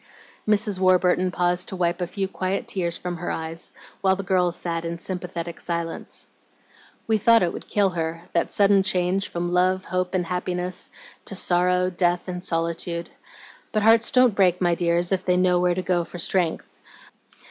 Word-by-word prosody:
Mrs. 210 Hz, -2 st, +1 dB
Warburton 185 Hz, 0 st, +3 dB
paused 180 Hz, 0 st, 0 dB
to -, -, -4 dB
wipe 175 Hz, 0 st, 0 dB
a 175 Hz, -, -1 dB
few 195 Hz, +1 st, -3 dB
quiet 190 Hz, 0 st, -3 dB
tears 170 Hz, -3 st, -2 dB
from 180 Hz, -1 st, -5 dB
her 175 Hz, -, -4 dB
eyes, 160 Hz, +1 st, -4 dB, 0.3 s
while 190 Hz, -1 st, +3 dB
the 195 Hz, -, -5 dB
girls 180 Hz, -2 st, +1 dB
sat 165 Hz, -1 st, -3 dB
in 170 Hz, 0 st, -4 dB
sympathetic 175 Hz, -1 st, -5 dB
silence. 170 Hz, -1 st, -4 dB, 0.8 s
"We 220 Hz, -1 st, +1 dB
thought 230 Hz, +1 st, +5 dB
it 170 Hz, -, 0 dB
would -, -, -8 dB
kill 200 Hz, -2 st, +2 dB
her, 165 Hz, -1 st, -3 dB
that 170 Hz, -, +1 dB
sudden 200 Hz, -1 st, +4 dB
change 190 Hz, 0 st, +1 dB
from 175 Hz, 0 st, -3 dB
love, 185 Hz, +1 st, +2 dB
hope, 185 Hz, +1 st, -2 dB
and 180 Hz, -1 st, 0 dB
happiness 180 Hz, 0 st, -3 dB, 0.4 s
to 195 Hz, -, -5 dB
sorrow, 180 Hz, 0 st, +2 dB
death, 175 Hz, 0 st, 0 dB
and 180 Hz, -1 st, -5 dB
solitude. 170 Hz, 0 st, -2 dB, 0.6 s
But 215 Hz, -1 st, 0 dB
hearts 225 Hz, +1 st, +5 dB
don't 255 Hz, -3 st, +4 dB
break, 185 Hz, -3 st, +3 dB
my 175 Hz, -1 st, +2 dB
dears, 170 Hz, +1 st, +1 dB
if 190 Hz, -1 st, 0 dB
they 180 Hz, -1 st, +2 dB
know 180 Hz, -1 st, +3 dB
where 180 Hz, 0 st, +2 dB
to 185 Hz, -, -2 dB
go 180 Hz, -1 st, +1 dB
for 175 Hz, -, -10 dB
strength. 175 Hz, -1 st, +1 dB
180 Hz, 180 wpm, -24 LUFS, 175-190 Hz, 0.8 s, thought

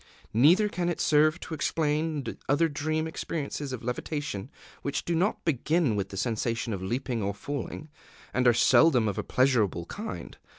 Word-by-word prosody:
Neither 165 Hz, -, +5 dB
can 175 Hz, -3 st, -2 dB
it 175 Hz, -, -2 dB
serve 155 Hz, +2 st, +3 dB
to -, -, -7 dB
explain 155 Hz, -1 st, 0 dB, 0.2 s
other 145 Hz, +4 st, +4 dB
dream 155 Hz, +1 st, -1 dB
experiences 150 Hz, -3 st, -4 dB
of 125 Hz, -3 st, -5 dB
levitation 125 Hz, -2 st, -3 dB, 0.3 s
which 140 Hz, -, -3 dB
do 170 Hz, -, 0 dB
not 180 Hz, +6 st, 0 dB
begin 155 Hz, -3 st, +1 dB
with 100 Hz, -1 st, -2 dB
the 95 Hz, -, -7 dB
sensation 115 Hz, +1 st, -1 dB
of 95 Hz, -, -4 dB
leaping 120 Hz, +4 st, -2 dB
or 100 Hz, 0 st, -2 dB
falling, 145 Hz, +5 st, -5 dB, 0.5 s
and 130 Hz, -1 st, +2 dB
are -, -, +8 dB
seldom 125 Hz, +1 st, +5 dB
of 100 Hz, -, -2 dB
a -, -, -2 dB
pleasurable 115 Hz, -10 st, +2 dB
kind. 215 Hz, -, -7 dB
140 Hz, 165 wpm, -28 LUFS, 115-160 Hz, 0.5 s, are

